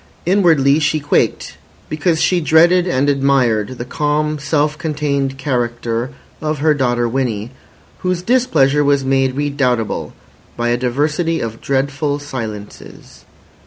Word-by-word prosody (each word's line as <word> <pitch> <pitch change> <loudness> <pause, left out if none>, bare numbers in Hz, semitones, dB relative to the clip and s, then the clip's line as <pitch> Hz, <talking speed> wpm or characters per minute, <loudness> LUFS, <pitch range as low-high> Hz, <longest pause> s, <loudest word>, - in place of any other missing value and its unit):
Inwardly 160 -7 +3
she 155 0 +1
quaked, 145 0 -1 0.3
because 160 +1 0
she 180 +1 +2
dreaded 170 +4 +4
and 140 -5 +1
admired 130 -5 +1
the 120 - -5
calm, 150 +3 -1
self 150 +1 0
contained 145 -4 -2
character 120 -2 -2 0.3
of 155 0 -2
her 155 +2 +3
daughter 120 -4 0
Winnie, 115 -3 -2 0.5
whose 180 -1 -2
displeasure 155 - +2
was 140 -1 +2
made 135 -1 +1
redoubtable 135 -6 -1 0.4
by 120 0 0
a 120 - +2
diversity 150 +7 0
of 115 0 -5
dreadful 140 +2 -1
silences. 110 - -8
140 Hz, 125 wpm, -17 LUFS, 125-155 Hz, 0.5 s, dreaded